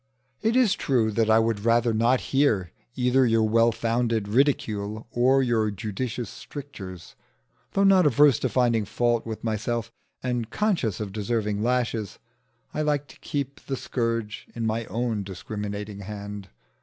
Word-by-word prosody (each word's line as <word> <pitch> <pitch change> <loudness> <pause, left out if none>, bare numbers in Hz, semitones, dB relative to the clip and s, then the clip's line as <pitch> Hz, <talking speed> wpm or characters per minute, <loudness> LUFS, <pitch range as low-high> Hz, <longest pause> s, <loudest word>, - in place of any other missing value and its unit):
It 225 +2 +1
is 250 -6 +4
true, 115 -5 +1
that 110 +1 +1
I 110 - +6
would 115 -2 +1
rather 115 0 +3
not 120 +4 +3
hear 115 - +2 0.2
either 125 +1 +3
your 115 -2 +3
well 115 +1 +4
founded 115 -2 0
ridicule 110 -4 0
or 130 +3 +3
your 115 -3 +1
judicious 110 +3 -4
strictures. 95 - -9 0.6
Though 195 - +3
not 190 -4 +6
averse 145 -1 +5
to 130 - 0
finding 120 -3 +2
fault 120 +2 0
with 110 -1 -5
myself, 115 +1 -2 0.3
and 120 -3 -2
conscious 180 - 0
of 105 -3 -5
deserving 105 -1 -1
lashes, 120 -3 -1 0.6
I - - -1
like 145 -1 0
to - - -15
keep 140 -1 -4
the 135 - -2
scourge 115 -4 -2
in 115 -1 -2
my 110 +1 -1
own 115 0 -2
discriminating 100 +2 -6
hand. 100 -1 -7
115 Hz, 150 wpm, -26 LUFS, 105-125 Hz, 0.6 s, I